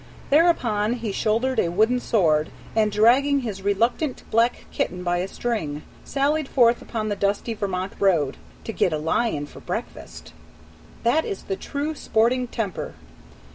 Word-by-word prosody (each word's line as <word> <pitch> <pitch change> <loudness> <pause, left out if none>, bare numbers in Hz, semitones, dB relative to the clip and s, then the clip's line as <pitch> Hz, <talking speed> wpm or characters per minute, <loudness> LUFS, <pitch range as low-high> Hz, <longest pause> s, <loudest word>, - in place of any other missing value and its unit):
Thereupon 240 -9 +3
he 230 -4 -3
shouldered 230 +5 0
a 170 - +2
wooden 220 +8 +2
sword, 160 -11 +2 0.3
and 215 -1 +3
dragging 260 +7 +4
his 210 -6 -5
reluctant 230 +8 0
black 230 +2 +2
kitten 180 0 -2
by 175 0 +1
a 180 +2 -1
string, 165 -11 -3 0.2
sallied 285 +1 0
forth 240 -3 +3
upon 215 -2 -3
the 205 - -1
dusty 200 +3 -1
Vermont 195 -2 -3
road 165 -9 +2 0.3
"to 225 - -5
get 175 - +1
a - - 0
lion 160 0 0
for - - -13
breakfast." - - -7 0.7
That 245 +7 +3
is 195 - -5
the 195 - -3
true 290 +9 -3
sporting 245 -2 +1
temper! 220 -7 -4
220 Hz, 150 wpm, -24 LUFS, 190-245 Hz, 0.7 s, dragging